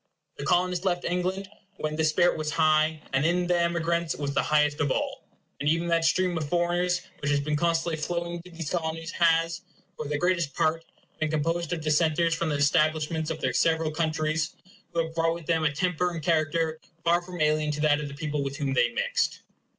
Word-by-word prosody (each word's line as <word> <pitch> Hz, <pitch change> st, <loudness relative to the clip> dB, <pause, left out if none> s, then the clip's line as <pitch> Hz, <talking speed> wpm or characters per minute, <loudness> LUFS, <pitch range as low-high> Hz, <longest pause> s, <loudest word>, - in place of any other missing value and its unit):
The -, -, -5 dB
Colonists 180 Hz, 0 st, +2 dB
left 180 Hz, -2 st, 0 dB
England 185 Hz, +2 st, -1 dB, 0.3 s
when 155 Hz, 0 st, -3 dB
this 155 Hz, 0 st, +2 dB
spirit 175 Hz, +3 st, +3 dB
was 155 Hz, -1 st, -3 dB
high, 155 Hz, 0 st, +2 dB
and 135 Hz, +1 st, +2 dB
in 175 Hz, +2 st, +2 dB
the 175 Hz, 0 st, +2 dB
emigrants 170 Hz, 0 st, 0 dB
was 140 Hz, -1 st, -3 dB
the -, -, +2 dB
highest 150 Hz, 0 st, +2 dB
of 145 Hz, -, +1 dB
all; -, -, -2 dB, 0.4 s
and 145 Hz, -, +1 dB
even 165 Hz, +2 st, +1 dB
that 165 Hz, -1 st, +2 dB
stream 185 Hz, +1 st, +2 dB
of 150 Hz, -2 st, -4 dB
foreigners 175 Hz, +1 st, +1 dB, 0.2 s
which 140 Hz, -, -2 dB
has 145 Hz, -1 st, +3 dB
been 150 Hz, +1 st, -1 dB
constantly 165 Hz, +1 st, +1 dB
flowing 170 Hz, +1 st, -2 dB
into 180 Hz, -, -13 dB
these 165 Hz, -3 st, -6 dB
Colonies 165 Hz, -1 st, -2 dB
has, 165 Hz, 0 st, +2 dB, 0.3 s
for 150 Hz, -, -5 dB
the 150 Hz, 0 st, -1 dB
greatest 170 Hz, -4 st, 0 dB
part, 165 Hz, +1 st, +1 dB, 0.4 s
been 155 Hz, -, 0 dB
composed 165 Hz, +2 st, -1 dB
of 170 Hz, -2 st, -2 dB
dissenters 155 Hz, +2 st, +2 dB
from 165 Hz, 0 st, -1 dB
the 150 Hz, -, 0 dB
establishments 155 Hz, +1 st, +1 dB
of 160 Hz, -1 st, -4 dB
their 130 Hz, -, 0 dB
several 160 Hz, +2 st, +2 dB
countries, 155 Hz, 0 st, -1 dB, 0.4 s
who 165 Hz, -1 st, 0 dB
have 160 Hz, -, -9 dB
brought 165 Hz, 0 st, +1 dB
with 170 Hz, -2 st, -9 dB
them 165 Hz, -1 st, +1 dB
a 150 Hz, -, +3 dB
temper 180 Hz, +3 st, 0 dB
and 165 Hz, -3 st, -6 dB
character 160 Hz, 0 st, +1 dB, 0.2 s
far 170 Hz, +1 st, +3 dB
from 175 Hz, 0 st, -9 dB
alien 155 Hz, 0 st, +2 dB
to 150 Hz, 0 st, -2 dB
that 150 Hz, -1 st, +3 dB
of 150 Hz, -, -4 dB
the 140 Hz, -, -8 dB
people 150 Hz, -1 st, -2 dB
with 140 Hz, 0 st, -4 dB
whom 140 Hz, -3 st, -1 dB
they 125 Hz, -2 st, +3 dB
mixed. -, -, 0 dB
160 Hz, 210 wpm, -27 LUFS, 150-170 Hz, 0.4 s, spirit